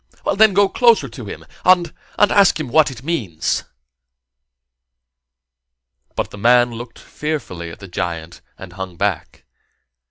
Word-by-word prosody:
Then 210 -1 +5
go 200 0 +5
closer 225 - +3
to 115 -1 -10
him, 100 - -9 0.2
and 180 -3 +4 0.2
and 205 - +4
ask 200 -4 +4
him 150 -5 -4
what 155 +4 +4
it 125 -2 -10
means." 115 - -2 2.5
But - - -3
the 105 - -10
man 120 +2 +4
looked 115 +1 -9
fearfully 140 - -5
at 85 - -10
the 100 - -10
giant 85 -1 -5 0.2
and - - -11
hung 95 -3 -7
back. 100 -3 -3
120 Hz, 135 wpm, -19 LUFS, -, 2.5 s, Then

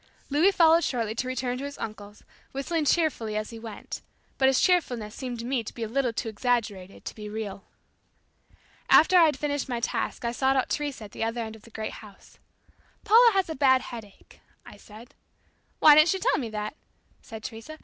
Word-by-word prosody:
Louis 310 +7 +4
followed 335 -3 +5
shortly 230 -4 -1
to 250 +3 -3
return 250 0 -2
to - - -5
his 285 0 -6
uncle's, 210 -1 -8 0.3
whistling 300 +4 -2
cheerfully 275 -9 +1
as 215 +1 -4
he 230 - -9
went; 220 -2 -8 0.4
but 265 - +5
his 265 -1 +3
cheerfulness 245 - +1
seemed 250 -3 -5
to 230 - -6
me 250 -2 -1
to - - -9
be 235 - -4
a - - -2
little 255 +2 0
too 230 - -4
exaggerated 215 -4 -2
to - - -5
be 210 -1 -8
real. 210 -2 -6 1.2
After 365 +4 +6
I'd 320 -3 +4
finished 285 -2 -2
my 240 -2 -2
task 235 - -3
I 235 - 0
sought 265 +2 +1
out 260 - +1
Teresa 290 -6 -3
at 205 - -10
the - - -4
other 230 +1 -2
end 220 -1 -6
of 220 - -15
the 230 - -16
great 220 -1 -5
house. 205 -3 -16 0.7
"Paula 465 +1 +7
has 385 -1 +1
a 320 - -4
bad 260 -2 +4
headache," 210 -4 -12 0.3
I - - -12
said. 220 +3 -14 0.6
"Why 305 - +8
didn't 310 +3 +6
she 385 - +2
tell 425 - +1
me 240 -5 -4
that?" 210 +3 -5 0.5
said 220 -2 -10
Teresa. 230 +8 -8
245 Hz, 200 wpm, -26 LUFS, 220-290 Hz, 1.2 s, Why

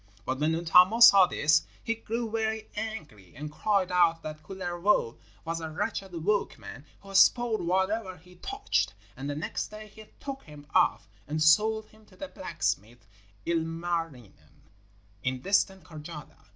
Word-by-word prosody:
But 130 +1 -2
when 155 +2 +1
Untamo 180 +6 +5
saw 200 -6 +9
this, 155 -2 +3 0.2
he 230 - 0
grew 230 0 -4
very 220 -1 -2
angry, 155 - -7
and 150 +3 -7
cried 195 +2 0
out 170 -2 +3
that 155 0 -7
Kullervo 175 - -1 0.3
was 165 0 -3
a 160 - -5
wretched 175 0 -4
workman 205 -8 -2 0.2
who 195 0 -12
spoiled 225 +3 +4
whatever 190 +1 0
he 180 +1 -19
touched, 405 - -1 0.2
and 140 +2 -6
the 145 - -3
next 155 - -3
day 215 0 -10
he 215 +1 -14
took 275 -1 -6
him 150 -1 -13
off 105 - +2 0.2
and 155 +2 -2
sold 215 +8 +4
him 215 0 -22
to - - -20
the 290 -2 -7
blacksmith 120 - -3 0.4
Ilmarinen 165 - -4 0.6
in 130 +1 -2
distant 195 -2 +1
Karjala. 155 -2 -11
175 Hz, 150 wpm, -28 LUFS, 155-215 Hz, 0.6 s, saw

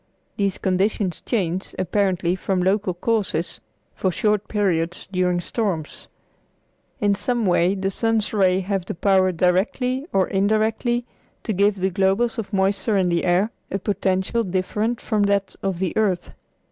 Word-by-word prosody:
These 200 -2 0
conditions 190 -1 0
change, 190 -5 -2
apparently 185 -1 +1
from 190 0 -1
local 190 -1 +1
causes, 200 -4 -1 0.3
for 190 - 0
short 210 +2 0
periods 175 -5 -1
during 180 -1 +1
storms. 175 -5 -3 0.9
In 205 -1 +3
some 235 +3 -1
way 180 +1 +3
the 195 0 -1
sun's 225 +1 0
rays 190 -2 +3
have 195 -1 -1
the 180 - -6
power 190 +1 +3
directly 240 - 0
or 190 -1 +2
indirectly 220 +4 +1 0.4
to 220 - -1
give 200 +2 +3
the 190 0 -1
globules 195 +6 +1
of 220 - -5
moisture 195 +1 +1
in 185 -2 +2
the 170 0 0
air 185 +5 +2 0.2
a 195 - -1
potential 195 +2 0
different 210 +5 -1
from 215 -3 -1
that 200 -1 +1
of 195 -2 -1
the 185 -1 -2
earth. 195 -5 0
195 Hz, 145 wpm, -22 LUFS, 185-210 Hz, 0.9 s, In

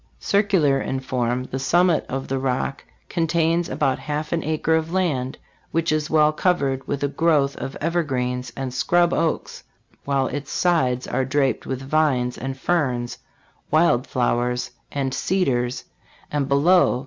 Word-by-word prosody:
Circular 190 -10 +2
in 135 - -2
form, 125 -1 -1
the 130 +1 -5
summit 175 +4 +2
of 135 +1 -3
the 135 0 -1
Rock 130 +1 -2 0.2
contains 165 0 +1
about 135 -1 0
half 150 0 -4
an 170 - 0
acre 155 +1 0
of 160 0 -1
land, 150 -9 -1 0.3
which 165 0 0
is 155 0 0
well 155 -1 +4
covered 140 -7 0
with 145 0 -2
a - - +3
growth 145 -2 +2
of 135 - -5
evergreens 130 -7 -1
and 130 -2 -4
scrub 175 +6 +2
oaks, 165 - -1 0.4
while 140 -1 +1
its 140 +1 -4
sides 130 -8 +1
are 135 - -1
draped 135 0 0
with 130 0 -3
vines 135 -4 +1
and 135 +2 -5
ferns, 130 -7 -1 0.5
wild 155 -6 +3
flowers 125 0 0 0.2
and 135 -2 -2
cedars, 130 -6 0 0.5
and 145 -2 0
below 145 +1 +4
140 Hz, 150 wpm, -23 LUFS, 130-165 Hz, 0.5 s, well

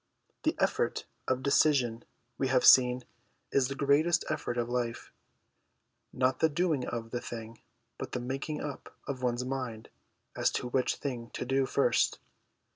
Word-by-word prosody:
The - - +1
effort - - 0 0.2
of 130 0 0
decision, 130 -5 +3 0.4
we 135 - +1
have 130 -1 +3
seen, 125 -1 +7 0.5
is 135 -2 +3
the 135 - -4
greatest 150 +5 +3
effort 125 -5 -2
of 120 -1 0
life; 120 -1 -3 1.0
not 130 0 +1
the 160 - +4
doing 155 -4 0
of 115 -1 -4
the 120 - -2
thing, 115 -1 -8 0.4
but - - -5
the - - -1
making 135 +4 -4
up 145 -2 -7
of 135 -2 -4
one's 125 0 0
mind 125 -4 -4 0.5
as - - +2
to - - -2
which 130 0 +1
thing 120 -4 -5
to - - -3
do 135 +1 +1
first. - - +2
130 Hz, 155 wpm, -30 LUFS, 120-140 Hz, 1.0 s, seen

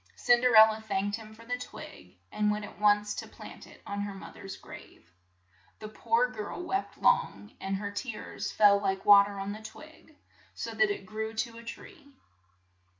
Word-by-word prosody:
Cin 240 -1 +3
der 250 -2 +3
el 220 0 +10
la 215 - -6
thanked 205 -1 -2
him 220 -1 -12
for 230 +1 -15
the 250 +1 -3
twig, - - -11
and 210 0 +1
went 210 0 -1
at - - -13
once 210 0 +3
to - - -6
plant - - -12
it - - -17
on 200 0 -4
her 205 -1 -5
mother's 195 0 -9
grave. 85 - -14 0.6
The 215 - -8
poor 460 - +1
girl - - -6
wept 385 +2 -3
long, 210 - +1
and 195 0 -2
her 200 +1 -4
tears 215 +2 -5
fell 200 -1 +5
like 195 -1 -2
wa 200 -1 +9
ter 200 0 -7
on 195 +1 -4
the 215 +1 -7
twig, 310 +6 -13 0.4
so - - -5
that 390 - +2
it 405 0 -4
grew 220 +1 -5
to 230 +1 -3
a - - -12
tree. 305 - -11
215 Hz, 195 wpm, -29 LUFS, 205-240 Hz, 0.6 s, el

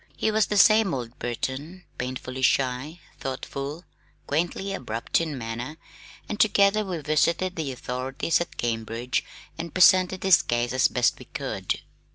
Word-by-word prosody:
He 220 - +1
was 215 -1 +2
the 210 - 0
same 215 -5 +6
old 120 -1 -6
Burton, 135 +9 -4 0.2
painfully 130 0 -4
shy, 130 +6 +1 0.2
thoughtful, 140 +4 -5 0.4
quaintly 175 +6 -1
abrupt 115 - -1
in 155 -4 -3
manner, 120 +5 -5 0.5
and 210 - -4
together 205 0 +4
we 185 -4 -3
visited 170 +5 +1
the 155 -5 -2
authorities 130 +6 -1
at 175 - -5
Cambridge 115 +1 -2 0.4
and 165 -1 -6
presented 185 0 +5
his 190 -2 +6
case 120 +1 -1
as 130 0 +4
best 125 -1 +1
we - - -11
could. - - -3
145 Hz, 145 wpm, -26 LUFS, 125-185 Hz, 0.5 s, same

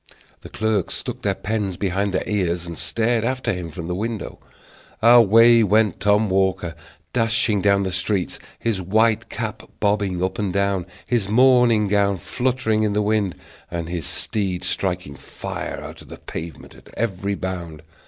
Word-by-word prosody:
The - - -11
clerks 110 -4 -1
stuck - - -5
their - - 0
pens 105 -4 -2
behind 100 +1 -1
their 95 - -2
ears, 90 -4 -1
and 85 -1 -6
stared 115 +5 0
after 130 0 -1
him 90 -2 -5
from 85 0 -7
the 90 - -3
windows. 110 +3 -4 0.6
Away 115 0 +7
went 105 -1 +2
Tom 105 +2 +3
Walker, 95 -3 0 0.4
dashing 115 -3 +2
down 100 0 +3
the 95 - -2
streets, 90 +1 -1 0.2
his 110 -5 -1
white 110 +4 +2
cap 110 -3 -4 0.2
bobbing 100 -3 0
up 95 +1 -2
and 100 -3 -1
down, 100 -1 0 0.2
his 115 -5 0
morning 125 -2 +5
gown 100 -1 +2
fluttering 125 0 0
in 105 -1 +1
the 105 - +1
wind, 105 -3 0 0.3
and 85 -1 -4
his 85 -4 -3
steed 95 -5 -2
striking 90 -6 -1
fire 70 - -6
out - - -9
of - - -15
the - - -10
pavement 80 0 -8
at - - -17
every 100 -3 -1
bound. 85 -5 -5
100 Hz, 165 wpm, -22 LUFS, 90-110 Hz, 0.6 s, Away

